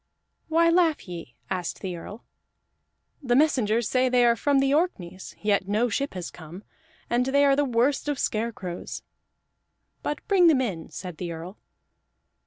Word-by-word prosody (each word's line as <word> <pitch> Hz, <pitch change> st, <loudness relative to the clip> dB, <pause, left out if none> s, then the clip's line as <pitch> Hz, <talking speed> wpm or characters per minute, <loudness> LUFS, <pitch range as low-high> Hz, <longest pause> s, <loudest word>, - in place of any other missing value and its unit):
"Why 335 Hz, +1 st, +4 dB
laugh 335 Hz, -, +2 dB
ye?" 165 Hz, -9 st, -8 dB, 0.2 s
asked 180 Hz, -2 st, -3 dB
the 185 Hz, -2 st, -4 dB
Earl. 205 Hz, +6 st, -9 dB, 1.0 s
"The 245 Hz, -4 st, +1 dB
messengers 240 Hz, -6 st, +2 dB
say 255 Hz, 0 st, +2 dB
they 245 Hz, -1 st, +4 dB
are 235 Hz, 0 st, +5 dB
from 285 Hz, +4 st, +1 dB
the 270 Hz, 0 st, +3 dB
Orkneys, 190 Hz, -, -2 dB
yet 200 Hz, -2 st, +1 dB
no 215 Hz, +4 st, +1 dB
ship 275 Hz, +3 st, -2 dB
has 180 Hz, -2 st, -5 dB
come, 175 Hz, +4 st, -11 dB, 0.4 s
and 245 Hz, +2 st, +1 dB
they 280 Hz, +1 st, +4 dB
are 275 Hz, -1 st, +5 dB
the 290 Hz, +1 st, +2 dB
worst 255 Hz, +4 st, +1 dB
of 290 Hz, -, -1 dB
scarecrows." 215 Hz, -7 st, -3 dB, 1.0 s
"But 295 Hz, -, -4 dB
bring 375 Hz, -4 st, +5 dB
them 305 Hz, -5 st, +5 dB
in," 190 Hz, -11 st, -3 dB
said 180 Hz, -4 st, -7 dB
the 175 Hz, 0 st, -4 dB
Earl. 170 Hz, +5 st, -8 dB
235 Hz, 160 wpm, -26 LUFS, 185-280 Hz, 1.0 s, are